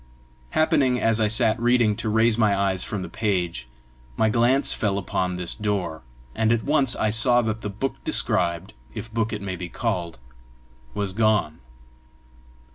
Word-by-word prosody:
Happening, 145 -6 +2
as 115 0 +1
I 110 - +3
sat 110 +1 +2
reading, 120 -3 +3
to 115 - -2
raise 110 +1 +3
my 105 -3 +2
eyes 95 -2 +1
from 100 -4 -4
the - - -6
page, 90 - -2 0.5
my 110 - +3
glance 120 +5 +2
fell 100 -2 -1
upon 90 -1 -2
this 90 -1 0
door, 100 -7 -3 0.3
and 110 - +1
at 115 -1 +1
once 140 -4 +2
I 110 - 0
saw 120 +2 +3
that 110 0 -3
the 105 - -4
book 105 +7 -5
described, 85 0 0 0.2
if 115 -1 -7
book 115 -1 -1
it 105 -2 -4
may 95 -2 -4
be 90 -1 -7
called, 85 -2 -3 0.8
was 100 -2 -1
gone. 105 -7 +1
110 Hz, 165 wpm, -24 LUFS, 95-115 Hz, 0.8 s, I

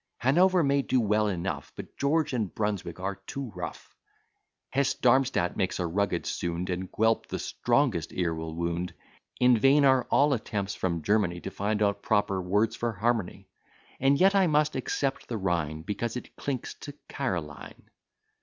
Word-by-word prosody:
Hanover 175 +8 +4
may 140 0 +2
do 130 -1 +1
well 105 -1 +2
enough, 90 -4 -3
But - - -9
George 150 +1 +1
and 110 -7 -1
Brunswick 100 -5 -2
are 95 +1 -3
too 120 +5 -7
rough; 90 -1 -7 0.8
Hesse 140 0 +1
Darmstadt 125 -8 +2
makes 95 -1 -1
a 90 - 0
rugged 100 +4 -1
sound, 85 +1 -2
And 90 +1 -4
Guelp 110 +1 +1
the - - -4
strongest 120 - 0
ear 85 -2 -1
will 80 0 -5
wound. 85 +1 -2 0.4
In 125 -2 +5
vain 140 +4 +5
are 130 -2 +4
all 145 +1 +4
attempts 105 -4 -3
from 85 -4 -2
Germany 100 -4 +1
To - - -6
find 105 +1 -1
out 100 0 0
proper 100 -3 +1
words 105 +5 +1
for 120 -1 -2
harmony: 110 -1 -1 0.5
And 135 +1 +3
yet 195 +1 +5
I 195 -2 +4
must 150 -1 +2
except 135 +1 -2
the 115 - -3
Rhine, 85 -5 -1
Because 115 +5 -3
it - - -10
clinks 135 -4 -4
to 145 - -8
Caroline. 85 - -5
105 Hz, 165 wpm, -28 LUFS, 90-130 Hz, 0.8 s, In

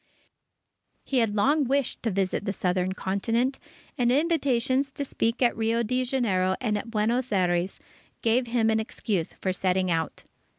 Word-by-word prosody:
He 265 - 0
had 220 -3 +1
long 285 +8 +3
wished 275 0 0
to 230 - 0
visit 195 0 -1
the 200 - -1
Southern 185 0 0
Continent, 225 +8 -1 0.4
and 240 -1 +3
invitations 275 -3 +1
to 285 - -3
speak 235 -1 -1
at 240 - +3
Rio 230 +1 +1
Janeiro 235 -6 +1
and 215 -4 0
at 210 +3 -4
Buenos 230 +3 0
Aires, 180 -1 +1 0.4
gave 240 +2 +2
him 230 -2 +2
an 220 - +2
excuse 205 -5 -2
for 185 - -2
setting 185 0 +1
out. 165 -1 -2
225 Hz, 155 wpm, -26 LUFS, 190-255 Hz, 0.4 s, long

